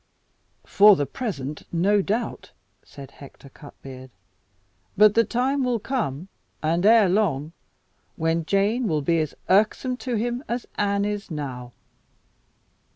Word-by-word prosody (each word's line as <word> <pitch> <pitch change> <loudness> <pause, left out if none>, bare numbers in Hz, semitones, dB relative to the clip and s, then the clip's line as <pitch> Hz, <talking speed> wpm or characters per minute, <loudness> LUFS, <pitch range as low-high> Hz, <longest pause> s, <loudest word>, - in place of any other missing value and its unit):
"For 205 0 +6
the 145 - -1
present, 150 - -5
no 195 +4 +2
doubt," 215 +5 -4 0.3
said 140 -2 -12
Hector 140 0 -15
Cutbeard; 130 -2 -12 0.9
"but 210 +1 +6
the 230 - +4
time 260 +4 -1
will 250 -2 0
come 195 - -3 0.4
and 165 +3 0
ere 225 -2 +6
long 170 -7 0 0.6
when 165 0 -1
Jane 205 +7 0
will 155 -5 -1
be 165 +3 +1
as 155 -2 -3
irksome 215 +6 +2
to 250 -1 -4
him 240 +4 -2
as 240 +1 -3
Anne 200 0 0
is 205 0 -4
now." 130 -6 -6
200 Hz, 130 wpm, -23 LUFS, 150-225 Hz, 0.9 s, For